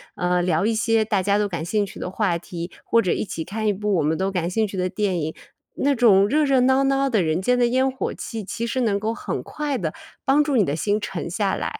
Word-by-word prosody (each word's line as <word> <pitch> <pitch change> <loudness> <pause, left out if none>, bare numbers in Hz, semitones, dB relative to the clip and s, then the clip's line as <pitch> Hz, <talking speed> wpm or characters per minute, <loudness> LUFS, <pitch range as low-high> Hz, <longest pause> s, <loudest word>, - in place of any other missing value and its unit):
呃， 180 0 +1
聊 175 +1 +1
一 225 - +2
些 225 0 +2
大 205 -3 +1
家 200 +2 +2
都 210 0 +1
感 170 -5 -4
兴 205 +4 0
趣 195 - -11
的 - - -4
话 190 -2 0
题， 170 0 -7
或 230 - +3
者 180 - 0
一 - - 0
起 165 -5 -5
看 215 +5 -3
一 210 - +3
部 210 +1 -1
我 165 - +1
们 155 +2 +1
都 190 +1 -1
感 175 -3 -1
兴 215 +4 0
趣 200 - -8
的 185 0 0
电 195 -3 -1
影， 155 +1 -3 0.4
那 285 +1 +2
种 205 -5 +5
热 300 +7 +2
热 275 -2 +3
闹 265 +2 +4
闹 275 0 +2
的 220 -6 +2
人 160 +2 0
间 250 +6 +2
的 245 -1 +3
烟 260 +2 +2
火 260 -1 -3
气， 225 -2 -6
其 225 +4 -4
实 255 +2 -1
能 210 -4 +1
够 220 +2 -1
很 - - -4
快 295 -3 -3
地 160 -7 -3 0.3
帮 285 +2 +4
助 290 -3 0
你 210 - +4
的 145 - -1
心 205 +6 0
沉 175 -5 -5
下 190 +2 0
来。 440 - -4
205 Hz, 290 characters per minute, -23 LUFS, 180-240 Hz, 0.4 s, 种